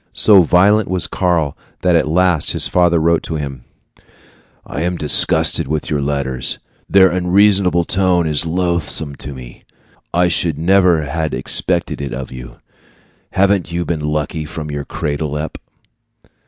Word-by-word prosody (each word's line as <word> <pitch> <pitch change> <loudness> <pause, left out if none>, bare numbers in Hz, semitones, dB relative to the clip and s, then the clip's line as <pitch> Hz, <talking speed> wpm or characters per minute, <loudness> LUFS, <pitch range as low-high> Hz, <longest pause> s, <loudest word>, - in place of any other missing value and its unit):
So 100 -3 +5
violent 95 +5 +3
was 90 -2 +4
Karl 85 -6 -1 0.3
that 90 -2 +2
at 80 - +2
last 85 -1 +1
his - - +4
father 90 -1 +2
wrote 85 +1 +2
to 80 - -6
him: 70 -4 -6 1.0
I - - -6
am 90 +1 -2
disgusted 75 -3 +3
with 75 +1 -3
your 75 -2 0
letters. 70 -3 -3 0.3
Their 95 -1 +5
unreasonable 90 0 +2
tone 90 -2 +1
is 75 -1 0
loathsome 85 -3 -2
to - - -8
me. 60 -2 -12 0.5
I 90 +1 +2
should 85 -3 -1
never 90 -1 +3
had 80 +1 -3
expected - - -1
it 70 - -5
of 65 -1 -7
you. 65 -1 -10 0.8
Haven't 95 -2 +1
you 85 0 -2
been 85 -2 -2
lucky 75 +1 -3
from 75 -1 -7
your 75 0 -5
cradle 75 -1 -4
up? 75 +1 -5
80 Hz, 150 wpm, -16 LUFS, 75-90 Hz, 1.0 s, So